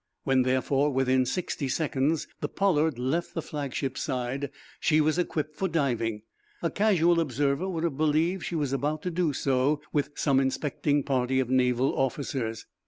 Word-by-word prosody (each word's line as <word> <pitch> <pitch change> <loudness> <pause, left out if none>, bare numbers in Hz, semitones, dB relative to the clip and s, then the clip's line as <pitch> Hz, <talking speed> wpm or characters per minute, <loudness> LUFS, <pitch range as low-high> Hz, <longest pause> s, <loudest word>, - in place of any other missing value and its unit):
When, 135 -1 +3
therefore, 130 +3 +1
within 130 -1 +2
sixty 165 -4 -2
seconds, 145 +1 0
the 145 - -3
"Pollard" 160 -8 +1
left 135 +8 -2
the 165 - -1
flagship's 140 -2 -3
side, 130 +2 -2 0.3
she 155 -1 +3
was 155 +3 +2
equipped 155 -3 -2
for 190 - -1
diving. 120 - -1 0.4
A 170 - +1
casual 175 -5 +3
observer 145 +4 0
would 165 -3 -3
have 160 -6 -1
believed 155 +4 +1
she 175 - -3
was 145 -4 -1
about 150 +3 -1
to 180 - -2
do 170 -2 +1
so 135 +2 +1
with 145 -1 +1
some 135 -3 +2
inspecting 145 +1 0
party 130 -1 +1
of 130 -1 -1
naval 125 0 +2
officers. 130 -4 -2
145 Hz, 165 wpm, -27 LUFS, 130-160 Hz, 0.4 s, When